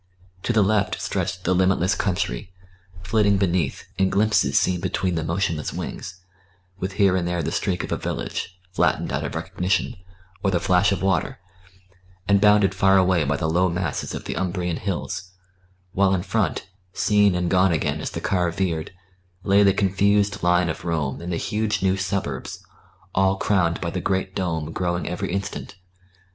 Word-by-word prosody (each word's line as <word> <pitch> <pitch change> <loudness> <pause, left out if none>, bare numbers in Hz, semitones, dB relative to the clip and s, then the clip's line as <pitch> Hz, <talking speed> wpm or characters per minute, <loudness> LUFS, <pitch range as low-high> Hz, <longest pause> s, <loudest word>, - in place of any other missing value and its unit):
To - - -1
the 110 -3 +4
left 105 0 +1
stretched 90 0 -3
the 95 - +2
limitless 95 0 +2
country, 90 -5 -2 0.5
flitting 100 0 +2
beneath, 90 -7 0 0.2
in 95 0 +3
glimpses 105 +2 +3
seen 90 -1 0
between 90 +1 -1
the 80 -1 -1
motionless 85 -1 -1
wings, 95 0 -6 0.6
with 95 +1 -3
here 100 -2 +3
and 90 -2 0
there 85 -1 -1
the - - -2
streak 90 -2 -1
of - - -6
a - - 0
village, 90 - -4
flattened - - +1
out - - -1
of - - -4
recognition, 90 +2 -1 0.5
or 95 - +2
the 90 -2 +1
flash 90 +3 +3
of 100 - -1
water, 95 -2 0 0.9
and 100 -1 +4
bounded 105 -2 +5
far 95 0 +4
away 90 -3 +3
by 70 +1 0
the 80 - -1
low 90 +3 +2
masses 85 -3 -3
of - - -6
the - - -4
Umbrian 90 -2 -2
hills; 95 -1 -4 0.6
while 95 -1 +3
in 90 - -2
front, 105 -4 -1 0.3
seen 105 -3 +3
and 90 -1 -1
gone 95 0 +4
again 80 - -1
as - - -3
the - - -6
car 90 -3 +1
veered, 85 -2 -2 0.5
lay 100 +1 +4
the 100 -1 +6
confused 100 +1 +2
line 90 0 +3
of 80 - -4
Rome 80 -5 -2
and 90 +1 -5
the 85 - -1
huge 105 +1 -1
new 95 0 +3
suburbs, 95 -8 -3 0.5
all 95 0 +3
crowned 90 -5 +1
by 85 -2 -3
the - - -3
great 95 0 -1
dome 80 -5 -2
growing 85 +1 -2
every 90 0 -3
instant. 100 0 -4
95 Hz, 175 wpm, -23 LUFS, 85-100 Hz, 0.9 s, the